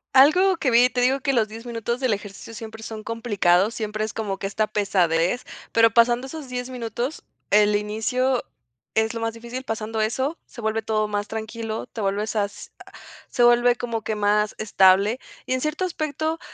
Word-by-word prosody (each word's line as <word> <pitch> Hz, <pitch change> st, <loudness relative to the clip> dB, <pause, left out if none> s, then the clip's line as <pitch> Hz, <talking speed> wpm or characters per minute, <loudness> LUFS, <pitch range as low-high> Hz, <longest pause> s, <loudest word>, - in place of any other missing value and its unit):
Algo 355 Hz, +8 st, +6 dB
que 275 Hz, -6 st, 0 dB
vi 240 Hz, +2 st, +6 dB
te 250 Hz, -, -2 dB
digo 265 Hz, +2 st, +2 dB
que 275 Hz, 0 st, +1 dB
los 230 Hz, -4 st, +2 dB
10 225 Hz, +2 st, -10 dB
minutos 235 Hz, +1 st, -3 dB
del 255 Hz, -4 st, +2 dB
ejercicio 205 Hz, +2 st, -7 dB
siempre 220 Hz, 0 st, -8 dB
son 220 Hz, -1 st, -6 dB
complicados, 210 Hz, -4 st, +1 dB
siempre 215 Hz, -1 st, -3 dB
es 220 Hz, -, -3 dB
como 205 Hz, -3 st, -3 dB
que -, -, -4 dB
esta 215 Hz, +2 st, 0 dB
pesadez, 185 Hz, -1 st, +1 dB, 0.3 s
pero, 230 Hz, 0 st, +5 dB
pasando 240 Hz, +4 st, +3 dB
esos 290 Hz, -2 st, -8 dB
10 250 Hz, 0 st, -4 dB
minutos, 245 Hz, +3 st, -4 dB, 0.3 s
el 210 Hz, 0 st, +5 dB
inicio 240 Hz, +5 st, 0 dB, 0.5 s
es 220 Hz, +1 st, +1 dB
lo 230 Hz, -, -4 dB
más 225 Hz, 0 st, -1 dB
difícil 235 Hz, +3 st, -7 dB
pasando 220 Hz, -2 st, -3 dB
eso, 260 Hz, +8 st, -1 dB
se -, -, -14 dB
vuelve 220 Hz, 0 st, -1 dB
todo 215 Hz, -1 st, 0 dB
más 205 Hz, 0 st, -3 dB
tranquilo, 220 Hz, 0 st, -4 dB
te 225 Hz, -, -7 dB
vuelves 205 Hz, +2 st, -1 dB
as 205 Hz, -1 st, -3 dB
a -, -, -16 dB, 0.4 s
se 245 Hz, -, +1 dB
vuelve 240 Hz, 0 st, +5 dB
como 235 Hz, -2 st, -3 dB
que 220 Hz, -, -2 dB
más 210 Hz, 0 st, +2 dB
estable. 200 Hz, +2 st, +4 dB, 0.3 s
Y -, -, -5 dB
en 255 Hz, -, 0 dB
cierto 305 Hz, +4 st, -1 dB
aspecto, 315 Hz, -2 st, -2 dB
225 Hz, 190 wpm, -24 LUFS, 210-250 Hz, 0.5 s, Algo